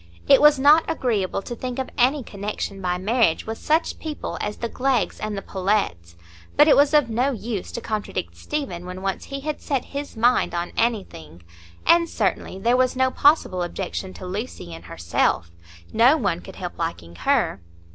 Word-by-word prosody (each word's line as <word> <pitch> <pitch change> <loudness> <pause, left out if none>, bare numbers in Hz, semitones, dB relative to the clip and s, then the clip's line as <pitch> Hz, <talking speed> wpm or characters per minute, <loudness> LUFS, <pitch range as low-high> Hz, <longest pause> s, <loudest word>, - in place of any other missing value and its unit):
It - - +7
was 300 -1 +7
not 295 +4 +6
agreeable 210 - -1
to 240 - -6
think 250 +1 -5
of 265 - -3
any 260 +3 +2
connection 200 -1 -5
by 180 -1 0
marriage 210 -2 +1
with 225 0 -5
such 315 +2 0
people 310 -2 -5
as 210 0 -3
the 235 - -3
Gleggs 255 +1 0
and 215 -1 -3
the 195 - -5
Pullets; 185 - -1 0.4
but 295 - +7
it 300 - +7
was 290 +2 +4
of 295 -5 +5
no 240 +4 +1
use 225 -6 -4
to 235 - -4
contradict 210 - -4
Stephen 180 - -4
when 185 +1 -7
once 195 -1 -2
he 275 0 -6
had 305 +1 -4
set 275 -3 -1
his 280 -4 -5
mind 240 -4 +2
on 175 +1 -2
anything, 90 - -2 0.4
and 335 0 +5
certainly 195 -3 -1
there 235 +5 +2
was 255 0 +2
no 260 0 +2
possible 285 - +3
objection 185 +1 -4
to - - -9
Lucy 185 - -5
in 80 - -9
herself,—no 85 - 0
one 190 - -1
could - - -11
help 180 -2 -7
liking 85 - -4
her. 95 - +1
215 Hz, 180 wpm, -23 LUFS, 180-260 Hz, 0.4 s, It